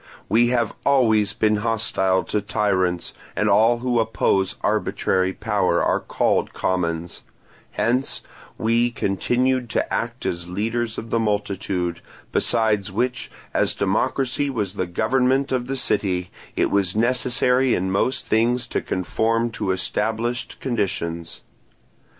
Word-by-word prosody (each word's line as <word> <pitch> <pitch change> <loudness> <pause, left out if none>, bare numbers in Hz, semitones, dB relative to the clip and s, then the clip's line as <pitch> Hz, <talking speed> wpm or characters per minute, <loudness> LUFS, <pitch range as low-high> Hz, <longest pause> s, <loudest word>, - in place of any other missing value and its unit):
We 115 +3 +4
have 120 -2 +1
always 110 -7 +3
been 105 0 +2
hostile 105 -4 +1
to 105 - -1
tyrants, 95 -4 0 0.2
and - - +1
all 115 +2 +4
who 120 -2 +2
oppose 100 -4 +1
arbitrary 95 0 +1
power 100 -4 0
are - - +2
called - - 0
commons; 85 -2 -2 0.5
hence 120 +5 0 0.3
we 115 +2 +2
continued 120 +4 0
to - - -1
act 115 +1 -3
as 85 0 -3
leaders 115 +4 -2
of 115 - -6
the 115 - +2
multitude; 100 -5 -1 0.3
besides 110 -3 +1
which, 125 +4 -1 0.2
as - - +2
democracy 135 +2 0
was 105 -8 -2
the 95 -3 -2
government 130 +8 +1
of 125 -1 -1
the 135 +1 -2
city, 90 -7 -1 0.2
it - - +1
was 100 -2 +1
necessary 125 +2 +2
in 95 +1 -1
most 125 +7 0
things 120 +2 +2
to - - -2
conform 115 +5 0
to 100 - -3
established 110 +6 -2
conditions. 95 -9 -3
110 Hz, 125 wpm, -22 LUFS, 95-120 Hz, 0.5 s, We